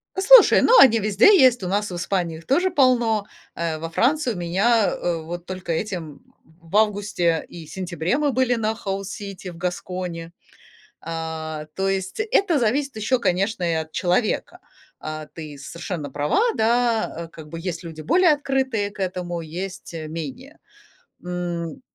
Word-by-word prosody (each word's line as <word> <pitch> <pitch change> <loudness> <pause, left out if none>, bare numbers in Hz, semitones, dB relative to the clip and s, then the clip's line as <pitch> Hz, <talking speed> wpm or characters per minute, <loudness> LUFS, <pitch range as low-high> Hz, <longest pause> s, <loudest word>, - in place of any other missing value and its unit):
Послушай, 420 +5 +7
ну, - - +6
они 230 -4 +7
везде 210 - +4
есть. 250 -5 +5
У - - -2
нас 205 +1 -1
в - - -5
Испании 175 -2 -2
их 165 - -14
тоже 355 +7 +2
полно. 240 - +3 0.3
Э, 165 -2 -2
во 165 +1 -5
Франции 255 - +1
у - - -8
меня, 200 +6 +2
э, 170 -2 -2
вот 170 +2 -7
только 185 -2 -5
этим 165 -5 -4 0.4
в 165 +2 -9
августе 205 -6 +1
и 165 -2 -10
сентябре 180 - -2
мы 295 -2 +1
были 255 -1 +2
на 220 -2 0
House 195 -3 -4 0.2
City 195 -2 -7
в 165 - -13
Гаскони. 180 -1 -4 0.7
А, 160 -1 -5
то 195 0 0
есть 190 - -2
это 395 -7 +2
зависит 265 +3 0
еще, 220 +4 +1
конечно, 195 0 0
и 170 -1 +1
от 160 0 -3
человека. 185 +5 0 0.4
А 155 0 -6
ты 150 -2 -9
совершенно 170 0 -6
права, 145 - 0 0.2
да, 230 -6 +1
э, - - -17
как 160 -2 -12
бы 165 +2 -7
есть 170 -1 -4
люди 160 -2 -8
более 345 - +4
открытые 265 -7 -1
к 205 - -18
этому, 180 -2 -3
есть, 180 +3 -7
э, 160 -2 -6
менее. 165 - -7 0.7
М 175 +1 -4
185 Hz, 165 wpm, -23 LUFS, 165-230 Hz, 0.7 s, Послушай